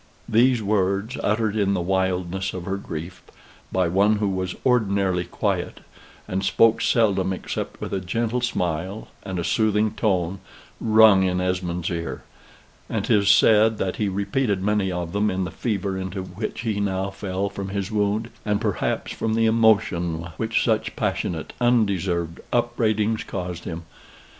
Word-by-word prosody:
These 120 +1 +3
words, 100 +3 0
uttered 110 0 0
in 100 -2 +2
the - - 0
wildness 95 +1 -1
of 90 - -5
her 95 +1 -2
grief, 85 -1 -7 0.5
by 95 -2 +2
one 100 +5 +3
who 105 -1 0
was 95 -1 -2
ordinarily 100 -7 +2
quiet, 85 - -2 0.5
and 95 +1 -2
spoke 115 +2 +4
seldom 100 -5 +2
except 95 - -4
with - - -5
a 95 - 0
gentle 115 +6 -1
smile 90 -3 -2
and 95 -2 -5
a 85 - -1
soothing 110 +2 +2
tone, 95 -3 0 0.4
rung 110 -3 +6
in 90 -1 +1
Esmond's 90 -1 -1
ear; 85 -1 -4 0.7
and - - -1
'tis 100 -2 +3
said 110 +1 +5
that 95 -2 -2
he 105 -2 0
repeated 100 +1 -1
many 105 -2 +1
of 90 -1 -4
them 105 +1 +2
in 95 -1 -1
the 90 - -4
fever 100 -5 -2
into 95 0 -4
which 95 +5 -5
he 110 -3 -1
now 95 -1 -1
fell 95 0 -3
from 100 0 -5
his 100 +1 -3
wound, 105 +2 0
and 105 -1 0
perhaps - - -1
from 110 0 -1
the 115 0 +3
emotion 90 -7 +2
which 115 0 0
such 110 -2 0
passionate, 80 -3 -2
undeserved 95 -8 +1
upbraidings 110 -2 +1
caused 90 -3 -5
him. 85 0 -5
100 Hz, 155 wpm, -23 LUFS, 90-110 Hz, 0.7 s, rung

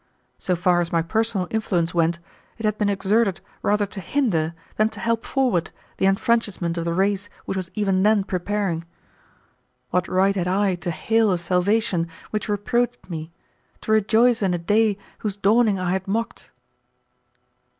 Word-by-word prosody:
So 180 - 0
far 175 0 +2
as 170 - -3
my 165 -1 +2
personal 220 +1 0
influence 180 -7 0
went, 170 0 +2 0.4
it 225 - -5
had 215 0 0
been 205 -1 +2
exerted 200 0 +1 0.2
rather 210 0 +2
to 200 0 -8
hinder 170 - 0 0.2
than 215 0 +3
to 220 - -10
help 230 +2 0
forward 245 -11 0 0.3
the 190 - +2
enfranchisement 195 -4 +1
of 170 -1 -3
the 170 - 0
race 200 +1 0 0.2
which - - -3
was 185 -2 -3
even 195 -3 +1
then 210 0 +4
preparing. 190 -2 -2 1.1
What 180 -1 +1
right 195 +2 +2
had 180 -2 -1
I 195 +1 +2
to 175 0 -4
hail 220 +5 +2
a 180 - +2
salvation 180 +1 +1 0.2
which 215 0 -3
reproached 240 +2 -1
me, 160 0 -5 0.5
to - - -3
rejoice 220 +3 +4
in 190 -3 +1
a - - -1
day 205 +4 +2 0.2
whose 205 -2 -3
dawning 210 +1 +3
I 180 -1 -1
had 190 +1 -2
mocked? 225 +4 -3
195 Hz, 165 wpm, -23 LUFS, 180-220 Hz, 1.1 s, then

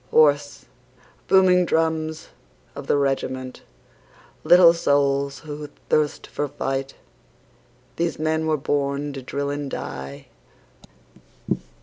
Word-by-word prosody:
Hoarse, 145 -2 +3 0.6
booming 185 -1 +5
drums 160 -1 -1 0.4
of - - -9
the - - +3
regiment, 130 -2 -2 0.8
Little 175 -1 +7
souls 140 -3 +1
who 150 -1 -7 0.2
thirst 150 -1 +1
for 145 - -3
fight, 135 -1 -3 1.0
These 170 0 -1
men 160 +1 0
were 155 -1 +2
born 140 0 -1
to 135 - -6
drill 140 +2 -3
and 145 -1 -4
die. 70 - -7
145 Hz, 100 wpm, -23 LUFS, 140-160 Hz, 1.0 s, Little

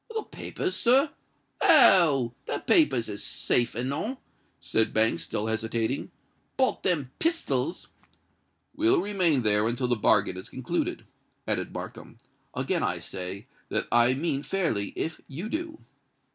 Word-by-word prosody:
"The 440 - -1
papers, 375 - -5
sir? 270 +5 +3 0.5
Oh! 170 - +6
the - - -1
papers 300 - +3
is 105 -1 -6
safe 120 -2 0
enow," 140 - -3 0.4
said 110 0 0
Banks, 110 -6 +3
still 105 +5 -3
hesitating; 115 +3 -2 0.5
"but 260 -1 +1
them 150 -9 0
pistols——" 330 0 -1 0.9
"Will 345 +4 +3
remain 180 - +1
there 105 0 +3
until 120 +2 -1
the 120 - +2
bargain 95 -4 +2
is 95 - -9
concluded," - - -3 0.4
added - - 0
Markham. - - -8 0.4
"Again - - -1
I - - 0
say 95 +2 -7 0.2
that - - -1
I 120 +2 +4
mean 140 -1 -1
fairly 150 - -1
if 160 - -4
you 160 +9 -6
do." 320 +3 -4
135 Hz, 130 wpm, -27 LUFS, -, 0.9 s, Oh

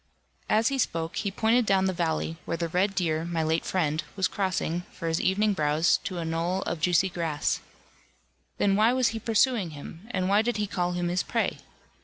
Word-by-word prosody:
As 220 +2 +3
he 275 -1 -2
spoke 165 -7 -1
he 205 - -1
pointed 225 +3 +2
down 190 -1 +3
the 190 - +1
valley, 165 -1 -1
where 165 - -2
the 170 0 -1
red 195 +4 +1
deer, 160 -3 0
my 170 -1 -1
late 160 +1 +1
friend, 160 -4 0
was 190 -2 +2
crossing, 180 -3 -1
for 165 - -6
his 160 0 0
evening 205 +3 +2
browse, 155 -1 +2
to 185 - -3
a 170 - -2
gnoll 165 +3 -1
of 170 - -3
juicy 180 +2 +3
grass. 165 -5 -1 1.0
Then 195 -1 +2
why 220 +4 +4
was 255 -2 +3
he 225 - -4
pursuing 225 -3 +2
him, 165 +7 -10
and 185 -5 -1
why 200 +2 +4
did 235 0 -1
he 210 - 0
call 180 -3 -1
him 175 0 -1
his 180 +1 +1
prey? - - -1
185 Hz, 205 wpm, -27 LUFS, 165-205 Hz, 1.0 s, why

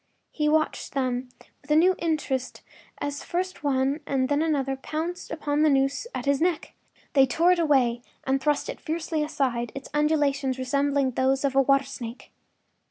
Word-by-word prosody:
He 300 -1 0
watched 310 0 0
them 255 -2 -1 0.3
with 280 - -22
a 300 - +4
new 360 +4 +5
interest 300 -6 -2 0.3
as 285 0 -4
first 370 -1 -3
one 275 +1 +1
and 265 -1 0
then 290 0 +2
the 315 -1 +1
other 270 0 -1
pounced 320 +6 -4
upon 295 -2 -1
the 310 - +5
noose 275 +8 +1
at - - -4
his 280 0 +2
neck. 345 -2 0 0.4
They 270 -2 +5
tore 335 +8 +3
it 360 - +2
away 260 -7 +2 0.2
and 270 0 0
thrust 295 +1 +1
it - - -6
fiercely 320 -1 -2
aside, 265 -6 -1
its 275 - -7
undulations 290 -3 +1
resembling 275 +1 +1
those 265 +2 +1
of 270 -1 0
a 270 - +6
water 275 0 +3
snake. 245 -1 -8
280 Hz, 175 wpm, -26 LUFS, 265-310 Hz, 0.4 s, a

